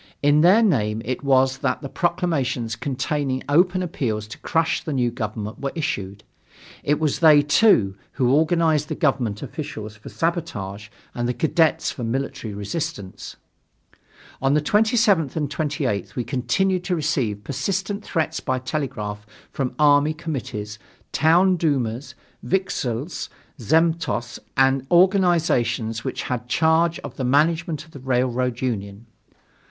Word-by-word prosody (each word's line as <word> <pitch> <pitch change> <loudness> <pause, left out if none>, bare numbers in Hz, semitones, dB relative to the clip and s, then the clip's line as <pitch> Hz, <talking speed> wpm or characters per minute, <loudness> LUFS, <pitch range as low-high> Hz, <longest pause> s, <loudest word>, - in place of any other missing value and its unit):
In 145 +1 +5
their 190 +7 +6
name 110 - +1
it 130 +3 -3
was 135 -1 +3
that - - -1
the - - -3
proclamations 140 -9 -1
containing 130 +2 -2
open 180 +5 +3
appeals 115 -11 -2
to - - -9
crush 165 0 0
the 155 - -3
new 125 -3 +1
government 110 -2 -5
were 140 -1 -3
issued. 100 - -3 0.6
It 150 +1 +1
was 155 -3 0
they, 155 -3 +7
too, 145 - +4 0.2
who 125 -3 +1
organized 160 -1 +2
the - - -3
government 125 - 0
officials 110 -9 -6
for 105 - -11
sabotage 105 - -3 0.2
and 120 0 -2
the 125 - -1
cadets 160 +4 +2
for 125 - -7
military 115 -2 -3
resistance. 105 - -5 1.1
On 135 +2 +2
the - - +4
27th 210 - +2
and 150 -3 -2
28th 140 -9 -2
we 125 - -1
continued 140 - 0
to 180 - 0
receive 130 -10 -1
persistent 195 - -2
threats 160 -5 -1
by 130 - -1
telegraph 115 -6 -4 0.2
from 130 -3 -3
army 150 +1 +4
committees, 110 - -5 0.3
town 175 +5 +4
dumas, 130 -5 -1 0.3
vikzhel 145 -10 -1 0.5
zemstvos, 160 -2 0 0.2
and 135 0 +3
organizations 165 - +2
(which - - -3
had 125 -1 -4
charge 160 +3 +3
of 135 -2 -9
the 130 - -3
management 155 +4 +1
of 160 - -20
the 140 - -10
Railroad 125 -1 0
Union). 105 -3 -3
140 Hz, 135 wpm, -23 LUFS, 120-165 Hz, 1.1 s, they